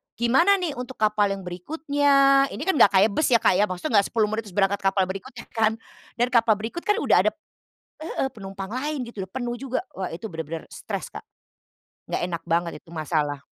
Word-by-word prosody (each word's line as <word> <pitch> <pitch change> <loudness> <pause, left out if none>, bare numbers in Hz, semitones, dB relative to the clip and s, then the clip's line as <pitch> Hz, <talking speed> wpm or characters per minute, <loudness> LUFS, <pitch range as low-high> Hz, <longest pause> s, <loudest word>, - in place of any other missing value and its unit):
"Gimana 270 +12 +4
nih 360 -5 -2
untuk 250 +1 -6
kapal 210 -1 +2
yang 195 - -9
berikutnya?" 275 - +2
Ini - - -6
kan 380 -6 +1
enggak 200 - +7
kayak 200 +3 +5
bus 310 - +1
ya 235 -4 +3
Kak 180 - +4
ya, 210 - +4
maksudnya 185 +4 +1
enggak 200 - +1
10 220 -3 +1
menit 220 0 -3
terus 185 - -12
berangkat 200 0 +2
kapal 195 0 +2
berikutnya 215 +7 -6
kan 220 -1 +2 0.4
dan 240 +1 +1
kapal 230 -3 +4
berikut 225 +10 -5
kan 415 - +4
udah 455 - +3
ada - - +3 0.7
heeh, 315 - -2
penumpang 195 0 -7
lain 275 0 -3
gitu, 225 -4 -7
udah 190 - -8
penuh 245 +1 -3
juga. 260 +1 -3 0.2
Wah 185 -2 -4
itu 170 +7 -6
benar-benar 160 -4 -6
stres - - -6
Kak. - - -7 0.9
Enggak - - -2
enak 175 -2 -4
banget 170 0 +1
itu - - -29
masalah. 155 -3 -2
215 Hz, 205 wpm, -24 LUFS, 190-260 Hz, 0.9 s, enggak